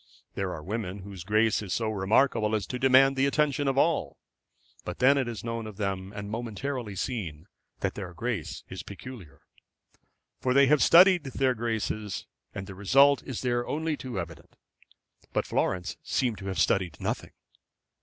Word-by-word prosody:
There 95 -2 -2
are 80 -3 -6
women 100 -1 -4
whose 95 -3 -8
grace 110 +3 +2
is 100 -3 -3
so 110 -2 -1
remarkable 110 +2 +2
as 105 -3 -1
to 125 - -5
demand 135 +1 +5
the 135 +1 +3
attention 145 0 +1
of 135 0 +1
all. 140 - +1 0.7
But 90 - -5
then 135 +2 +5
it 135 -3 0
is 115 -5 -5
known 115 -1 -4
of 105 -3 -10
them, 95 -2 -3
and 100 0 -5
momentarily 115 +1 -4
seen, 90 - -4 0.4
that - - 0
their 95 -3 -6
grace 110 -3 -3
is - - -7
peculiar. 100 - -10 1.0
They 130 +2 +5
have 150 +1 +4
studied 180 -2 +7
their 135 -1 +1
graces, 110 -3 -3 0.3
and 95 - -6
the 95 - -9
result 135 +8 +4
is 130 -5 -5
there 120 -1 0
only 160 +1 -1
too 125 -8 -5
evident. 85 -2 -8 0.8
But - - 0
Florence 90 -1 -1
seemed 120 -5 -1
to 95 - -7
have 95 - -3
studied 90 -6 +1
nothing. - - -3
110 Hz, 165 wpm, -28 LUFS, 95-130 Hz, 1.0 s, studied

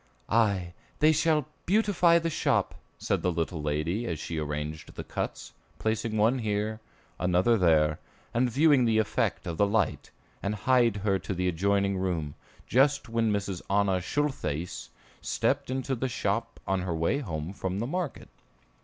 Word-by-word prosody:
"Aye, 100 -6 +2 0.2
they 155 +2 +5
shall 155 -2 +2 0.2
beautify 185 -4 +4
the 165 0 -1
shop," - - +1 0.2
said - - -1
the 90 - +1
little 80 -1 -2
lady 75 +10 -1
as 85 - -2
she 80 +1 -4
arranged 75 +1 -5
the - - -5
cuts, - - -5 0.2
placing 110 0 -1
one 115 +5 +3
here, 110 0 -1 0.4
another 90 +6 +3
there, 80 -6 +3 0.3
and 125 +2 +2
viewing 140 0 +4
the 110 -1 +2
effect 110 -1 0
of 85 - -4
the 100 - +4
light, 110 +2 0 0.3
and 100 +1 -1
hied 125 -4 +4
her 95 -2 +2
to 95 - -4
the 90 +1 0
adjoining 100 +2 +1
room, 85 -6 -2 0.3
just 135 -1 +2
when 115 -1 +1
Mrs. 100 -3 -2
Anna 100 -2 +2
Schultheiss 90 - -2 0.3
stepped - - 0
into 130 +1 -2
the 130 +1 -1
shop 115 +1 -2
on 95 -1 0
her 90 -2 -2
way 85 - +1
home 85 - -4
from 95 -1 -3
market. 175 0 -4
100 Hz, 155 wpm, -28 LUFS, 90-125 Hz, 0.4 s, they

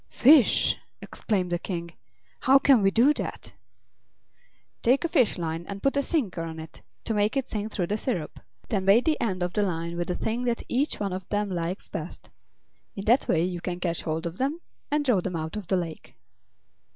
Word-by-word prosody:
"Fish!" 275 -1 +5 0.2
exclaimed 185 -5 -2
the 175 - 0
King; 170 -2 -5 0.5
"how 270 +1 +6
can 275 -4 +5
we 195 - +4
do 240 +9 +4
that?" - - -5 1.3
"Take 260 +7 +3
a - - +2
fish 280 -9 +2
line 165 -1 -3
and 200 0 -7
put 275 - +2
a 280 - +3
sinker 260 - -1
on 165 -1 -5
it, 160 0 -10 0.2
to 225 - -1
make 210 +5 +1
it 270 - -1
sink 215 0 -4
through 180 - -1
the 205 +4 -1
syrup. 185 - -3 0.3
Then 195 -4 0
bait 205 +5 +5
the 310 -1 +1
end 185 -5 -1
of 180 0 -2
the 210 - +1
line 170 -3 -2
with 175 -1 -2
the 180 - -1
thing 230 +3 -2
that 235 -1 -1
each 275 +5 0
one 200 -3 -2
of 185 -1 -6
them 205 -1 -1
likes 175 +2 -3
best. - - -7 0.6
In 195 - -6
that 240 +5 +3
way 165 -1 +2
you 175 -1 -3
can 175 0 -4
catch 170 -2 -2
hold 160 +1 -3
of 170 +1 -5
them 280 +5 -1 0.3
and 295 0 0
draw 235 -9 +3
them 180 -1 -4
out 160 +3 -4
of 210 -4 -6
the 190 - +2
lake." 160 -8 -6
195 Hz, 210 wpm, -26 LUFS, 175-245 Hz, 1.3 s, how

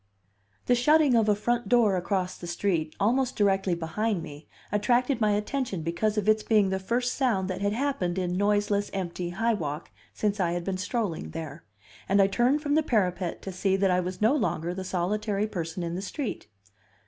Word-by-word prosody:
The 245 - +3
shutting 295 +3 +4
of 225 -2 +3
a 205 - +4
front 240 +1 -1
door 230 -5 +4
across 185 0 -1
the 175 - -9
street 170 -3 -1
almost 250 +5 +1
directly 195 -3 +2
behind 175 +3 -2
me 145 -1 -10 0.2
attracted 240 +4 +1
my 210 -1 +3
attention 210 - -2
because 190 +7 -1
of 210 -1 0
its 215 0 +4
being 210 -3 +3
the 190 0 -1
first 245 +6 -1
sound 225 -9 +1
that 185 - -5
had 200 0 +1
happened 230 -9 -1
in 180 -1 -1
noiseless, 205 +1 +1
empty 180 -2 -3
High 225 +6 0
Walk 155 -5 -4 0.2
since 210 -1 -1
I 175 -2 +1
had 175 0 -2
been 190 +1 -2
strolling 185 - -2
there; 155 - -7 0.4
and 195 +1 +4
I 195 - +7
turned 245 +9 +2
from 290 -1 0
the 310 - +4
parapet 185 - -1
to 195 - -5
see 190 +1 0
that 195 -1 +2
I 180 - +3
was 180 +2 -4
no 220 +5 +4
longer 175 - -1
the 190 +1 -5
solitary 200 +3 -1
person 175 -4 -4
in 170 0 -3
the 180 - -3
street. 240 - -5
200 Hz, 195 wpm, -27 LUFS, 180-225 Hz, 0.4 s, I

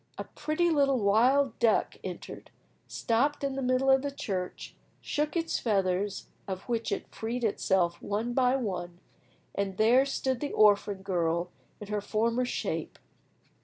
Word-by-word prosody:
A - - -3
pretty 335 +3 -1
little 280 -3 +3
wild 240 +5 +3
duck 230 -2 +2
entered, - - -8 0.4
stopped 275 +6 0
in 275 -1 -1
the 270 - -3
middle 255 +1 +2
of 265 0 +5
the 285 - -2
church, 190 -9 -5 0.3
shook 300 +2 -2
its 330 -1 -1
feathers, 195 -2 0 0.2
of 190 -1 -4
which 230 -2 -2
it - - -4
freed 235 +2 -4
itself 190 -5 +1
one 220 +4 -2
by 255 0 +3
one, 180 -8 -4 0.5
and 195 -1 -2
there 240 +5 +5
stood 260 -2 -1
the 290 - -4
orphan 205 -2 +3
girl 170 -2 -1 0.3
in 210 - -9
her 210 -1 -1
former 230 +4 0
shape. - - -3
225 Hz, 150 wpm, -29 LUFS, 195-265 Hz, 0.5 s, of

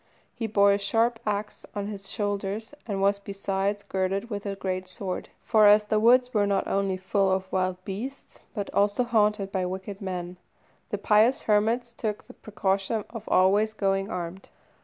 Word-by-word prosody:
He 225 - -3
bore 200 -1 +4
a 200 - +2
sharp 225 +3 +1
axe 210 0 -3
on 205 -1 -2
his 200 -1 -6
shoulders, 205 +3 -3
and 195 -3 -1
was 200 0 +3
besides 200 0 -2
girded 195 +3 -2
with 205 0 -4
a 200 - -2
great 185 -1 -3
sword; 185 0 -4
for 215 -2 +5
as 210 +1 +6
the 215 0 +1
woods 250 +3 +4
were 205 -2 +2
not 200 -1 0
only 195 -1 0
full 190 +1 +1
of 190 0 -1
wild 185 -1 0
beasts, 235 +8 -7 0.2
but 205 -2 -4
also 205 +4 +2
haunted 210 -4 +1
by 190 -2 -1
wicked 190 +2 -6
men, 180 -2 -5 0.5
the 205 - -2
pious 215 +5 +3
hermits 225 +3 +1
took 215 -2 -3
the - - -14
precaution 200 0 -1
of 230 -2 -8
always 205 +4 +4
going 195 -1 0
armed. 175 +1 -6
200 Hz, 175 wpm, -27 LUFS, 195-215 Hz, 0.5 s, as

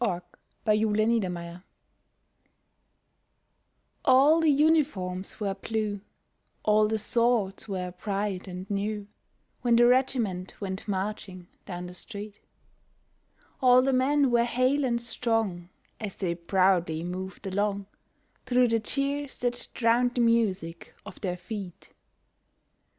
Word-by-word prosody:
WHEN 185 -7 0 0.5
THE 215 -1 +3
REGIMENT 220 +2 +2
CAME 185 -2 -2
BACK 170 +1 -8 2.4
All 275 +5 +6
the 320 -1 +3
uniforms 280 - +1
were 200 -2 -1
blue, 205 0 -3 0.6
all 215 0 +4
the 220 +1 0
swords 220 -2 +1
were 185 -3 -3
bright 195 +1 -3
and 185 +1 -7
new, 205 +1 -2 0.6
When 240 -1 +3
the 240 +1 +6
regiment 240 -7 +1
went 190 0 -5
marching 190 -2 -4 0.2
down 180 -1 -5
the 180 - -8
street, 205 +2 -9 1.2
All 255 -1 +6
the 270 0 +1
men 270 +1 +3
were 235 -1 +4
hale 255 +4 +1
and 235 -2 0
strong 225 -7 -1 0.3
as 210 -3 -5
they 180 -4 -1
proudly 175 -2 +1
moved 185 +2 -6
along, 200 +1 -1 0.6
Through 250 -1 +4
the 230 0 +2
cheers 280 +4 -2
that 245 0 -1
drowned 245 +1 +2
the 245 - +2
music 200 -8 0
of - - -11
their 180 -3 -2
feet. 190 -2 -8
210 Hz, 125 wpm, -27 LUFS, 185-240 Hz, 2.4 s, All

